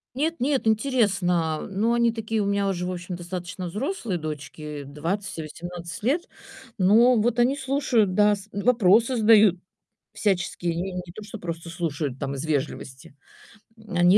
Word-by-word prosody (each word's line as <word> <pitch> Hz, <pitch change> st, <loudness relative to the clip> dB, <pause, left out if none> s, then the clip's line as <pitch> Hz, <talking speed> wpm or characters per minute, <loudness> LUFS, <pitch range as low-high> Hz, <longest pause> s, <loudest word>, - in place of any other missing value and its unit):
Нет, 320 Hz, +4 st, 0 dB
нет, 270 Hz, 0 st, +1 dB
интересно. 195 Hz, -, +1 dB
Ну 210 Hz, +4 st, +1 dB
они 235 Hz, -1 st, +3 dB
такие 225 Hz, -1 st, -2 dB
у 200 Hz, -, 0 dB
меня 200 Hz, 0 st, +1 dB
уже, 180 Hz, -2 st, -2 dB
в 185 Hz, -, -2 dB
общем, 175 Hz, 0 st, -5 dB
достаточно 180 Hz, +1 st, -6 dB
взрослые 220 Hz, -, -3 dB
дочки 150 Hz, -1 st, -6 dB
20 165 Hz, +9 st, -3 dB
и -, -, -2 dB
18 170 Hz, +3 st, -7 dB
лет. 315 Hz, +8 st, +1 dB, 0.5 s
Ну 225 Hz, +5 st, +5 dB
вот 240 Hz, +2 st, +1 dB
они 260 Hz, +4 st, +3 dB
слушают, 265 Hz, -8 st, +1 dB
да. 210 Hz, 0 st, +4 dB
С 200 Hz, +1 st, -12 dB
вопросы 230 Hz, +2 st, +3 dB
задают, 215 Hz, -4 st, +6 dB, 0.5 s
всяческие, 180 Hz, -4 st, -1 dB
не 185 Hz, +2 st, -3 dB
не 180 Hz, -1 st, -6 dB
то 215 Hz, -, -9 dB
что, 215 Hz, +1 st, -8 dB
просто 170 Hz, -1 st, -6 dB
слушают 150 Hz, -5 st, -3 dB
там 140 Hz, 0 st, -3 dB
из 135 Hz, -, -4 dB
вежливости. 140 Hz, -2 st, -4 dB, 0.7 s
Они 175 Hz, +2 st, +5 dB
190 Hz, 155 wpm, -25 LUFS, 170-225 Hz, 0.7 s, задают